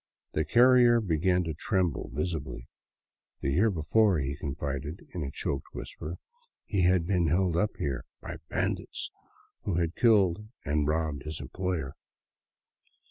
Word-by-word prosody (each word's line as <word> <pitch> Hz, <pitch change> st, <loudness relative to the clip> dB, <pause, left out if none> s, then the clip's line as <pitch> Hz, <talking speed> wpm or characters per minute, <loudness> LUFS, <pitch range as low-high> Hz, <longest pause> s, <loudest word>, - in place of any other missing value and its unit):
The 80 Hz, -, +1 dB
carrier 120 Hz, -1 st, +6 dB
began 90 Hz, -2 st, +2 dB
to 80 Hz, -2 st, -3 dB
tremble 90 Hz, +1 st, 0 dB
visibly. 70 Hz, -5 st, -3 dB, 0.7 s
The 70 Hz, -, 0 dB
year 95 Hz, +11 st, +4 dB
before, 95 Hz, +3 st, +3 dB
he 70 Hz, -1 st, -2 dB
confided 70 Hz, +2 st, -4 dB
in 90 Hz, -, -3 dB
a 70 Hz, -, -2 dB
choked 70 Hz, -1 st, -3 dB
whisper, 85 Hz, +4 st, -6 dB, 0.5 s
he 100 Hz, -4 st, 0 dB
had 90 Hz, -1 st, +4 dB
been 90 Hz, -2 st, +2 dB
held 90 Hz, +2 st, +2 dB
up 105 Hz, +5 st, +1 dB
here 65 Hz, -4 st, -2 dB
by -, -, -7 dB
bandits, -, -, -2 dB, 0.5 s
who 95 Hz, -, -1 dB
had 85 Hz, 0 st, 0 dB
killed 105 Hz, -4 st, +4 dB, 0.2 s
and 75 Hz, +1 st, +1 dB
robbed 80 Hz, -2 st, 0 dB
his 75 Hz, +1 st, -5 dB
employer. 90 Hz, -7 st, -3 dB
85 Hz, 135 wpm, -29 LUFS, 75-95 Hz, 0.7 s, carrier